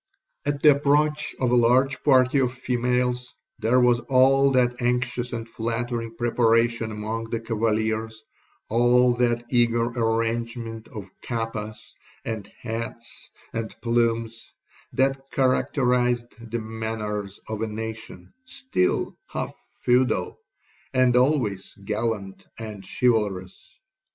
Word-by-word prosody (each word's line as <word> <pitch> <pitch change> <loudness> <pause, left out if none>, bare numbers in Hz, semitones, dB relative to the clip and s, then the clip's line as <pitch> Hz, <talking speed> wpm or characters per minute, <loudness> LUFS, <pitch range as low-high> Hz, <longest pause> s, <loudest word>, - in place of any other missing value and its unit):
'At 145 -1 -1
the 150 - +9
approach 150 +2 +1
of 125 -2 +1
a - - +4
large 125 +3 +3
party 135 0 +4
of 125 -2 +2
females, 125 0 -1 0.2
there 115 +4 +3
was 125 -1 +4
all 135 +1 +5
that 125 -1 +2
anxious 125 0 0
and 115 -1 -4
flattering 115 0 -3
preparation 115 -1 +2
among 110 +2 -4
the 115 0 -3
cavaliers,—all 110 +2 0
that 120 -1 +1
eager 120 -1 +3
arrangement 115 -1 -2
of 105 -3 -8
capas, 115 -2 -5 0.3
and 110 -3 -5
hats, 115 0 -6 0.2
and 115 -1 -4
plumes,—that 115 +3 -1
characterized 125 -3 +1
the 120 - -2
manners 110 -3 -4
of 110 -1 -4
a 115 - 0
nation 110 +1 -7
still 255 - -1
half - - -4 0.3
feudal, 125 +1 +2 0.6
and 130 -1 +4
always 125 -7 +1
gallant 100 -1 -3
and 110 -3 -7
chivalrous. 100 - -1
115 Hz, 105 wpm, -25 LUFS, 110-125 Hz, 0.6 s, the